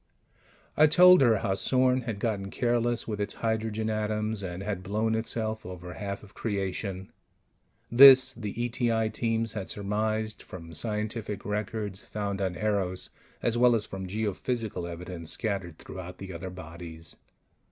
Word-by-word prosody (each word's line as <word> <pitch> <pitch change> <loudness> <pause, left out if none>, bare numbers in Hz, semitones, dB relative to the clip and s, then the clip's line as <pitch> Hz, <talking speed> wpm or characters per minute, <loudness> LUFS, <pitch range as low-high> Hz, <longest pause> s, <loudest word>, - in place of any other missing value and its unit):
I 155 - +7
told 180 +3 +8
her 115 -4 +5
how 95 - +2
Sorn 130 +5 +2
had 115 -4 -4
gotten 100 -3 -2
careless 120 +1 0
with 105 -2 -3
its 100 - -1
hydrogen 110 -1 -1
atoms 110 0 -1
and 90 0 -5
had 100 -2 -3
blown 110 +4 0
itself 110 -1 -2
over 90 -1 -8
half 100 -1 -5
of 100 - -15
creation. 95 -2 -3 0.8
(This 130 +1 +9
the 105 -2 -6
E.T.I. 115 -2 +1
Teams 115 -1 -1
had 100 -3 -5
surmised 110 +2 -1
from 85 -2 -10
scientific 105 +2 -3
records 105 -1 -3
found 100 -2 -4
on 95 -2 -1
Eros, 95 -3 -1 0.3
as 120 0 +1
well 120 -1 +6
as 110 -2 0
from 95 -1 -6
geophysical 105 -1 -2
evidence 85 -1 -6
scattered 95 -4 -3
throughout 90 -1 -8
the 95 -1 -7
other 90 +3 -6
bodies.) 85 -2 -9
105 Hz, 145 wpm, -28 LUFS, 95-115 Hz, 0.8 s, This